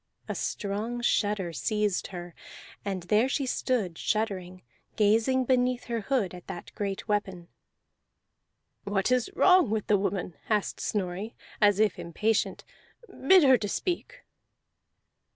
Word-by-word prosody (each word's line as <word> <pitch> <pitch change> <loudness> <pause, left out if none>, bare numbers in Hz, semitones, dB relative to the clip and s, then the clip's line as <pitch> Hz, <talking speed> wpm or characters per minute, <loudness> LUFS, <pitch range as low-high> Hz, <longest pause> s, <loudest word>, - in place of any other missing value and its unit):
A - - -2
strong 215 +4 -3
shudder 205 -6 +1
seized 210 +1 -1
her, 175 -2 -8 0.5
and 190 -3 -3
there 215 +7 +2
she 275 0 0
stood 225 -9 -1
shuddering, 185 -4 -2 0.3
gazing 225 +5 +3
beneath 250 -1 +1
her 235 -2 -3
hood 215 -6 0
at 180 -1 -11
that 175 - -8
great 200 -1 -4
weapon. 190 -5 -2 1.3
"What 200 +3 0
is 250 -2 +2
wrong 370 - +5
with 215 -1 -1
the 205 -2 +3
woman?" 195 -3 -2
asked 210 -2 0
Snorri 200 +2 -3 0.3
as 205 -1 +5
if 215 -4 +2
impatient. 205 +6 -1 0.4
"Bid 375 -5 +4
her 260 -3 +6
to 205 -1 -3
speak." 475 - -3
210 Hz, 130 wpm, -28 LUFS, 190-240 Hz, 1.3 s, her